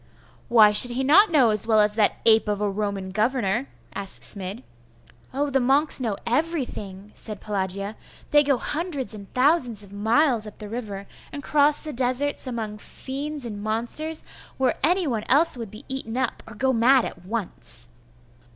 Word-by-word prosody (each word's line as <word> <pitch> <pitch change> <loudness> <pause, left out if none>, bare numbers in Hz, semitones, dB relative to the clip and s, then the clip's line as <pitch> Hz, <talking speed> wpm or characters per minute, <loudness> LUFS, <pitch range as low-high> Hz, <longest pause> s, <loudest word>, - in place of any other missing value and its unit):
'Why 220 -3 +6
should 210 +4 +5 0.2
not 370 +10 +6
he - - -14
know 265 -8 +4
as 215 +1 0
well 220 -2 +4
as 210 0 +3
that 210 -1 +1
ape 220 -1 +5
of 205 -1 -1
a 210 - 0
Roman 200 -2 -3
governor?' 225 +2 0 0.3
asked 195 -1 +3
Smid. 200 +4 -2 0.7
'Oh, 285 +2 -2
the 270 - +2
monks 275 +3 +3
know 220 -5 -2
everything,' 235 - -3
said 215 -3 -4
Pelagia. 200 0 -4 0.4
'They 295 - +6
go 275 -2 +2
hundreds 295 -4 -2
and 200 -2 -11
thousands 255 - +2
of 200 0 -14
miles 225 +2 +1
up 210 - -11
the 210 - -8
river, 205 -4 -6 0.3
and 285 -2 -7
cross 295 0 +4
the 305 -1 -6
deserts 260 +3 -1
among 220 -4 -5
fiends 280 +4 -6
and 210 -3 -6
monsters, 240 +9 0 0.3
where 260 -2 +2
any 355 +5 +2
one 230 -7 -2
else 315 +4 +3
would 230 -4 -7
be 215 +2 -12
eaten 260 -3 -5
up, 260 -2 -2
or 225 - -11
go 260 +4 +1
mad 250 +2 +4
at 175 - -8
once. 180 - -5
235 Hz, 175 wpm, -24 LUFS, 210-275 Hz, 0.7 s, Why